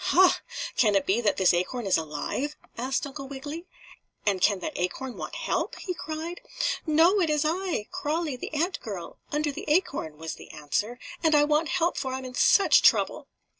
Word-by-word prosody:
"Ha! 370 0 +5 0.4
Can 210 -4 +4
it 195 -1 +2
be 210 +5 +2
that 215 - +1
this 190 -2 +5
acorn 195 +7 -1
is 195 - +3
alive?" 160 - -2 0.2
asked 260 +4 -1
Uncle 275 -1 -7
Wiggily. 290 +6 -7 0.6
"And 195 -3 +1
can 200 +1 +4
that 310 - -4
acorn 245 +8 -3
want - - -6
help?" - - -1
he 365 - -4
cried. 330 +1 -5 0.5
"No, 335 +6 +5
it 330 - +2
is 300 0 +1
I 340 - -1
Crawlie, 305 -1 -1
the 250 - -6
ant 335 +5 0
girl 195 -6 -7
under 295 0 0
the - - -7
acorn," 295 - 0
was 160 +1 -5
the - - -12
answer, 160 +11 -2 0.2
"and 320 -2 +4
I 295 - +6
want 300 +2 +2
help, 350 -1 +1
for 260 -2 -2
I'm 260 0 -4
in 255 - -7
such 395 +9 +5
trouble." - - +3
285 Hz, 190 wpm, -27 LUFS, 210-320 Hz, 0.6 s, I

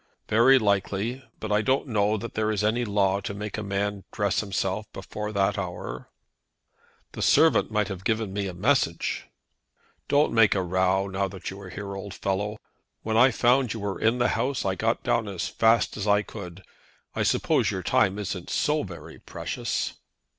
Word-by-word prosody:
"Very 120 +5 +6
likely; 105 +3 0 0.2
but 110 - -5
I 105 +1 +3
don't 130 +4 +1
know 105 -4 +1
that 115 +2 -6
there 110 0 0
is 105 -1 0
any 115 +3 +1
law 100 -2 +2
to 100 - -5
make 105 0 -5
a 110 - -3
man 100 0 -2
dress 100 -2 0
himself 100 0 -2
before 105 +2 -5
that 100 0 +1
hour." 90 -2 -6 1.0
"The - - -7
servant - - +4
might 105 -2 0
have 95 -2 -6
given 110 -2 -1
me 100 0 -2
a 95 - -5
message." 95 -4 0 0.8
"Don't 145 +1 +3
make 110 -3 +5
a 95 - +1
row 95 +2 +1
now 100 0 -2 0.2
you 95 +1 -5
are 95 - -9
here, 100 +1 -6
old 100 0 -7
fellow. 100 +2 -2 0.5
When 110 0 -1
I 125 +4 +7
found 125 0 +2
you 115 - -6
were 100 -1 -3
in 115 +2 +3
the 120 0 +2
house 130 -3 -1
I 95 - +1
got 115 +4 -1
down 115 -2 +1
as 95 -4 -3
fast 115 0 +2
as 105 0 -4
I 105 0 +4
could. 95 -4 -9 0.5
I - - -1
suppose - - +2
your - - -3
time 95 +1 +2
isn't 95 -3 -4
so 150 0 +1
very 85 - -9
precious." - - -3
105 Hz, 185 wpm, -26 LUFS, 95-110 Hz, 1.0 s, I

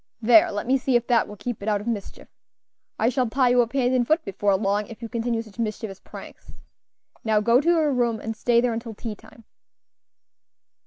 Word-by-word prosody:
There! 225 -1 +5
let 205 0 -4
me 265 +2 +2
see 255 0 0
if 240 0 +2
that 235 -1 +2
will 210 - -9
keep 210 +2 -6
it 205 - -2
out 205 -1 +1
of 205 - -9
mischief. 220 -4 -5 0.7
I 220 - +1
shall 255 -2 0
tie 255 +1 +2
you 245 0 +4
up 235 0 -3
hand 255 -2 +1
and 245 -2 +1
foot 320 +1 +1
before 200 0 0
long, 200 +1 0
if 230 - -11
you - - -4
continue 230 0 -2
such 215 0 -17
mischievous 215 -3 -4
pranks. - - -12 0.7
Now 220 -2 +2
go 235 +4 +3
to 335 - +1
your 315 -4 +3
room, 235 -3 0
and 225 +1 -5
stay 235 +1 +2
there 245 -1 0
until 225 -1 -6
tea 225 +1 -5
time." 220 +2 -17
230 Hz, 215 wpm, -24 LUFS, 215-245 Hz, 0.7 s, There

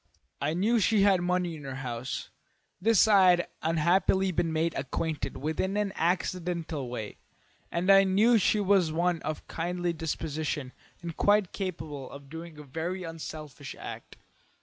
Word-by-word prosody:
I 150 +3 0
knew 220 +6 +2
she 210 0 +3
had 195 -3 +4
money 180 -1 0
in 150 - -10
her 135 -1 -5
house; 125 -1 -5 0.5
this 220 +1 +5
I 195 -3 +6
had 175 -1 +3
unhappily 175 +4 +2
been 165 -1 0
made 160 +1 0
acquainted 150 +3 -3
with 155 +3 -3
in 190 +2 0
an 205 -2 0
accidental 170 -5 -1
way, 110 -4 -6 0.5
and 170 +2 -1
I 195 0 +8
knew 215 +5 +4
she 210 +2 +2
was 195 -4 +3
of 165 -2 -1
kindly 175 +1 -2
disposition 155 -3 -3 0.3
and 170 -2 -5
quite 205 -2 +3
capable 155 -8 -5
of 140 0 -12
doing 165 -1 -8
a 150 - -9
very 165 +6 -4
unselfish 155 -4 -7
act. - - -9
170 Hz, 150 wpm, -29 LUFS, 155-190 Hz, 0.5 s, I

